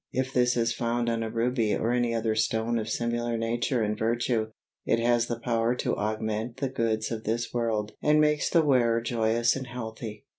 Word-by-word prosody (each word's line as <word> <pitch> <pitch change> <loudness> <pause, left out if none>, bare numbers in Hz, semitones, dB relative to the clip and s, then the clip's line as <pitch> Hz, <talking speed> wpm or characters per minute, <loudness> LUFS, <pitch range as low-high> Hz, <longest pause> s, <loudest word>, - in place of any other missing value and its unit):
If 130 +1 -2
this 125 0 +2
is 115 0 +1
found 120 0 -1
on 115 0 -1
a 115 - -2
ruby 115 -1 0
or 115 - 0
any 120 -1 +1
other 110 -1 0
stone 110 +2 0
of 110 -1 -4
similar 120 +1 -1
nature 115 +1 0
and 105 0 0
virtue, 115 0 0 0.4
it - - +2
has 120 0 +2
the 120 -1 -3
power 115 0 0
to - - -1
augment 110 +2 -2
the 135 0 -1
goods 115 -4 -1
of 110 -1 -4
this 115 +2 -2
world 110 -3 -1
and 150 0 +4
makes 150 -1 +2
the 165 -3 +3
wearer 120 -5 +3
joyous 115 0 +1
and 130 -1 -5
healthy. 110 -3 -7
115 Hz, 195 wpm, -27 LUFS, 110-120 Hz, 0.4 s, and